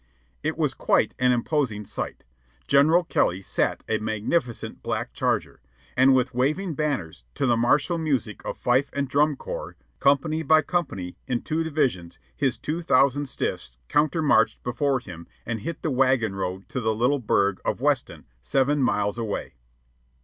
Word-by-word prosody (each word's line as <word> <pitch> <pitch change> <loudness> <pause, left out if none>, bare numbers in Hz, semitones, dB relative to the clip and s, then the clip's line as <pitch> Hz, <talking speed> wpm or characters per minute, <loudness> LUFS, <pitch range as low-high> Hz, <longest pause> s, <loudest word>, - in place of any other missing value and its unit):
It - - -2
was - - +1
quite - - +1
an 125 0 +4
imposing 120 -4 0
sight. - - -5 0.4
General 155 +6 +5
Kelly 95 - 0
sat - - -1
a 110 -1 0
magnificent 110 +5 -2
black - - -3
charger, - - -1 0.3
and 130 +1 +5
with 125 0 +1
waving 155 +9 0
banners, 135 - -3
to - - 0
the 120 -2 +3
martial 145 +9 +2
music 135 -10 -2
of - - -5
fife 130 +3 +2
and 140 -1 -1
drum 145 +2 +2
corps, - - -6 0.2
company 145 +3 +2
by 155 0 +4
company, 95 - -3
in 120 -1 -1
two 160 +1 -1
divisions, 135 - -1 0.2
his 135 -3 0
two 160 +3 -3
thousand 140 -1 +3
stiffs - - -4
countermarched 155 +1 +2
before 135 +2 0
him 85 -8 -10 0.2
and 115 -1 -3
hit 160 +9 -6
the 155 - 0
wagon 130 -5 +2
road 95 0 -4
to 130 - -3
the 110 -1 0
little 125 +6 +2
burg 100 -4 +1
of - - -1
Weston, - - -1 0.2
seven 135 - +1
miles 105 -3 +1
away. 110 -3 -4
130 Hz, 155 wpm, -25 LUFS, 110-150 Hz, 0.4 s, General